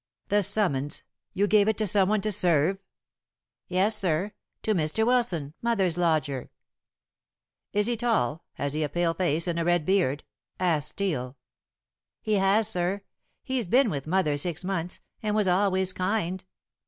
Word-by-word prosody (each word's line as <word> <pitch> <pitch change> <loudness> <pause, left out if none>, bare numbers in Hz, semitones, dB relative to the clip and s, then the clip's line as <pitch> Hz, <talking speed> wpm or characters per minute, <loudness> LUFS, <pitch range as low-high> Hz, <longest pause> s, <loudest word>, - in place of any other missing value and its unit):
"The 205 +1 +3
summons! 145 -9 0 0.3
You 200 - +1
gave 205 0 +4
it 220 - +1
to 215 - +1
someone 200 +1 +3
to 215 - 0
serve?" 180 -2 +2 0.9
"Yes, 190 +4 +2
sir. 185 +2 0 0.3
To 220 - +1
Mr. 170 +5 0
Wilson, 210 - 0
mother's 200 -8 +1
lodger." 155 -7 0 1.2
"Is 210 0 +1
he 240 +1 0
tall? 215 - 0
Has 140 0 -3
he 155 - -1
a 150 - 0
pale 175 +1 0
face 165 -2 0
and 170 -1 -1
a - - 0
red 175 -2 +2
beard?" 175 -7 +1 0.4
asked 160 -5 +1
Steel. 140 -11 -3 0.8
"He 215 - -2
has, 200 +3 +3
sir. 190 -1 -2 0.4
He's 260 -6 -2
been 245 +3 +4
with 140 -1 -4
mother 160 -4 +1
six 170 +2 -3
months, 180 -2 -3 0.2
and 210 -1 -1
was 210 -2 +2
always 190 0 +2
kind. 185 -1 -1
185 Hz, 155 wpm, -27 LUFS, 160-210 Hz, 1.2 s, gave